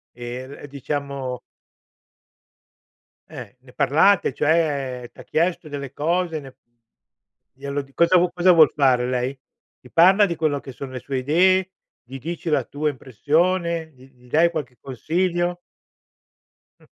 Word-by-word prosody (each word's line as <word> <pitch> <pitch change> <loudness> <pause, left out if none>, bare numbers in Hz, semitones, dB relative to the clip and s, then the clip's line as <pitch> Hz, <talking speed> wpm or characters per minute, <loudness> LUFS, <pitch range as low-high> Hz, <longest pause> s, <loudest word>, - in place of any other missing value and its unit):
E 120 +2 -7
v 145 +1 -11
diciamo 140 -2 -4 1.9
Eh, 120 - -10
ne 125 -1 -19
parlate 160 +4 +3
cioè 140 -5 0
t'ha - - -13
chiesto 170 -1 -1
delle 140 -2 -6
cose, 165 +1 -1
ne 135 -2 -11 1.1
glielo 140 +1 -3
di 135 0 -18
cosa 170 +4 +4 0.2
cosa 180 +1 +4
vuol 160 -4 +6
fare 130 -3 +3
lei? 125 +2 -2 0.4
Ti 125 - -17
parla 190 +5 +6
di 170 -3 -3
quello 155 -3 0
che 135 - -10
sono 130 +1 -8
le 130 - -6
sue 135 +2 -4
idee? 185 +7 +2 0.3
Gli 130 +2 -9
dici 170 +3 -5
la 145 -4 +2
tua 150 +5 -2
impressione? 160 - -1
Gli 130 +1 -18
gli 125 0 -22
dai 165 +5 +4
qualche 145 -7 -6
consiglio? 175 +6 -2 1.2
Mh. - - -21
145 Hz, 140 wpm, -22 LUFS, 130-170 Hz, 1.9 s, vuol